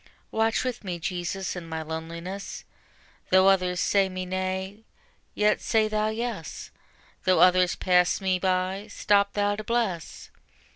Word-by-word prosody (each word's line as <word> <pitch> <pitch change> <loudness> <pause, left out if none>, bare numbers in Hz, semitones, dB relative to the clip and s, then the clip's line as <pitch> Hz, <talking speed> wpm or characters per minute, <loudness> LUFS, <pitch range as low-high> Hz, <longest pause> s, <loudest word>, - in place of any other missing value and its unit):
Watch 225 0 +1
with 250 -3 -4
me, 180 -3 -4
Jesus, 180 +2 -3
in 170 -2 -7
my 160 0 -4
loneliness: 170 +5 -6 0.7
Though 190 +1 +6
others 180 -2 +2
say 195 +1 +2
me 185 0 -5
nay, 190 +3 -3 0.5
yet 210 0 +2
say 220 -1 +2
Thou 215 0 0
yes; 220 -7 -4 0.5
Though 185 -1 +4
others 180 0 +5
pass 180 -1 +3
me 190 -2 0
by, 185 +2 -1
stop 200 -1 +2
Thou 205 0 +1
to 215 - -5
bless. 215 -8 -2
190 Hz, 140 wpm, -26 LUFS, 180-205 Hz, 0.7 s, Though